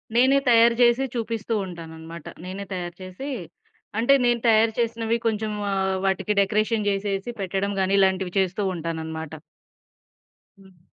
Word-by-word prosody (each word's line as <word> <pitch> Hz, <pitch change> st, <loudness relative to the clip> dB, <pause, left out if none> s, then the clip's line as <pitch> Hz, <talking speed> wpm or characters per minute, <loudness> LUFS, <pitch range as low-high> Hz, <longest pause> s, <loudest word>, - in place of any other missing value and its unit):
నేనే 260 Hz, +3 st, +5 dB
తయారు 235 Hz, 0 st, +6 dB
చేసి 240 Hz, +3 st, +4 dB
చూపిస్తూ 230 Hz, -1 st, -2 dB
ఉంటాననమాట. 165 Hz, -2 st, -9 dB, 0.2 s
నేనే 195 Hz, +2 st, -6 dB
తయారు 175 Hz, -1 st, -5 dB
చేసి 185 Hz, +9 st, -7 dB, 0.7 s
అంటే 240 Hz, +4 st, +5 dB
నేను 240 Hz, -1 st, +3 dB
తయారు 225 Hz, 0 st, +5 dB
చేసినవి 230 Hz, 0 st, 0 dB
కొంచెం 215 Hz, -1 st, -1 dB, 0.2 s
ఆహ్, 190 Hz, -1 st, 0 dB
వాటికి 195 Hz, +2 st, +1 dB
డెకరేషన్ 215 Hz, +2 st, +1 dB
జేసేసి 195 Hz, +2 st, -2 dB
పెట్టడం 195 Hz, +1 st, -1 dB
గానీ, 190 Hz, +1 st, +1 dB
ఇలాంటివి 190 Hz, -1 st, +2 dB
చేస్తూ 190 Hz, +2 st, 0 dB
ఉంటాననమాట. 160 Hz, -1 st, -5 dB, 1.3 s
హ్మ్. 190 Hz, -3 st, -20 dB
195 Hz, 125 wpm, -24 LUFS, 185-230 Hz, 1.3 s, తయారు